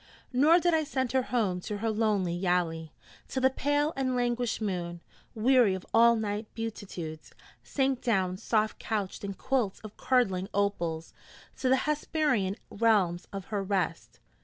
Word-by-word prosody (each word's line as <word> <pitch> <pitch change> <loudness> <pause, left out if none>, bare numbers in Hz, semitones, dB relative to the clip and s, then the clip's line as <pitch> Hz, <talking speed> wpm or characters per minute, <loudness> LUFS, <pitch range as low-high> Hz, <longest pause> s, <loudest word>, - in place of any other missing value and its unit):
Nor 305 +7 +6
did 350 0 +2
I 320 -1 +3
send 260 -4 -2
her 265 - +3
home 210 -8 -1
to 210 +3 -4
her 225 +2 -1
lonely 210 -5 +1
yali, 175 -3 0 0.4
till 260 - -3
the 265 - +5
pale 290 +3 0
and 260 -2 0
languished 245 -1 0
moon, 175 -5 -3 0.4
weary 235 -3 +4
of 185 - -8
all 235 +1 +6
night 210 -1 -3
beatitudes, 190 -8 -6 0.3
sank 265 -2 0
down 190 -6 +1
soft 215 +1 0
couched 205 -4 -3
in 200 -1 -4
quilts 250 -4 -1
of 215 -1 -11
curdling 195 -7 +1
opals 170 -5 -1 0.4
to 260 - 0
the 260 - +6
Hesperian 295 -9 0 0.2
realms 200 -6 +2
of 195 -2 -6
her 205 - +1
rest. 190 -4 -2
215 Hz, 155 wpm, -29 LUFS, 185-255 Hz, 0.4 s, Nor